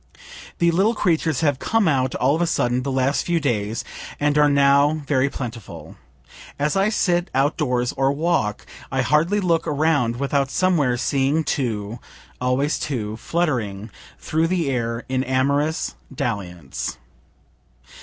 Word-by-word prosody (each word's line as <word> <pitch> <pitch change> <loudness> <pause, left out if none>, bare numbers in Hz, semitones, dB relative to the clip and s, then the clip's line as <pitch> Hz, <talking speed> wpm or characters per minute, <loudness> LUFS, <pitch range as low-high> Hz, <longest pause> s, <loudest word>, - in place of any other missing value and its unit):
The 170 0 +3
little 200 +7 +2
creatures 165 -7 +1
have 145 -4 +1
come 225 +3 +1
out 130 -4 +1
all 130 +3 +2
of 165 - -2
a 175 - +2
sudden 125 -5 +1
the 135 +1 -3
last 135 +2 +1
few 170 -1 0
days, 115 -6 -1 0.4
and 145 0 +1
are 150 0 +5
now 140 +2 +3
very 140 -1 +2
plentiful. 110 - -8 0.6
As 150 +1 0
I 195 +2 +3
sit 175 -4 +1
outdoors, 130 -3 +1
or 135 0 +2
walk, 145 -8 -1 0.3
I 135 0 +1
hardly 165 +9 +2
look 170 -4 +1
around 145 -5 +1
without 140 +1 0
somewhere 150 -7 +2
seeing 140 +5 +1
two 115 -6 -2 0.4
(always 130 +4 +1
two) 110 -7 -3
fluttering 115 - -2 0.3
through 160 +1 0
the 170 -5 0
air 115 -2 -2
in 130 0 0
amorous 140 +4 0 0.2
dalliance. 90 - -4
140 Hz, 140 wpm, -22 LUFS, 125-160 Hz, 0.6 s, are